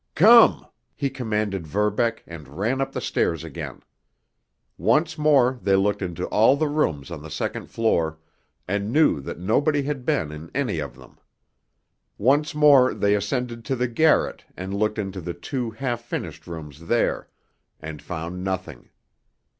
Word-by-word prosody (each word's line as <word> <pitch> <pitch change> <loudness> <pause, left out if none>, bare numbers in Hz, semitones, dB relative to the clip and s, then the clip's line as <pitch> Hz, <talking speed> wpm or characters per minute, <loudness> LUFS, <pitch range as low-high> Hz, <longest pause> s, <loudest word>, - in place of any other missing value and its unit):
"Come!" 225 +7 +7 0.3
he 140 -3 -2
commanded 105 - -2
Verbeck, 105 +6 0
and 80 -4 -10
ran 120 +7 0
up 135 - -2
the - - -4
stairs 85 -1 0
again. 80 -4 -7 0.9
Once 160 +1 +2
more 135 -5 +3
they 100 -1 +3
looked 100 +1 +1
into 90 -1 -3
all 115 +6 +5
the 155 +2 0
rooms 85 - -1
on 80 -3 -6
the 80 - -9
second 80 - -4
floor, 85 -9 0 0.5
and 100 +3 -2
knew 150 - +3
that 65 - -7
nobody 140 - +1
had 140 -2 -3
been 130 - 0
in 75 +2 -9
any 125 - -1
of 70 -4 -5
them. - - -17 1.0
Once 145 +7 +2
more 145 -4 +6
they 100 0 +2
ascended 115 +3 -2
to 135 - -1
the 125 0 0
garret 155 +7 +2
and 95 +2 -5
looked 105 +2 0
into 95 -2 -4
the 85 +1 -5
two 120 +7 -4
half 120 +1 -3
finished 120 - -6
rooms 80 -1 -9
there—and 80 -8 -4
found 90 +1 -6
nothing. 95 -9 -5
105 Hz, 155 wpm, -24 LUFS, 85-135 Hz, 1.0 s, Come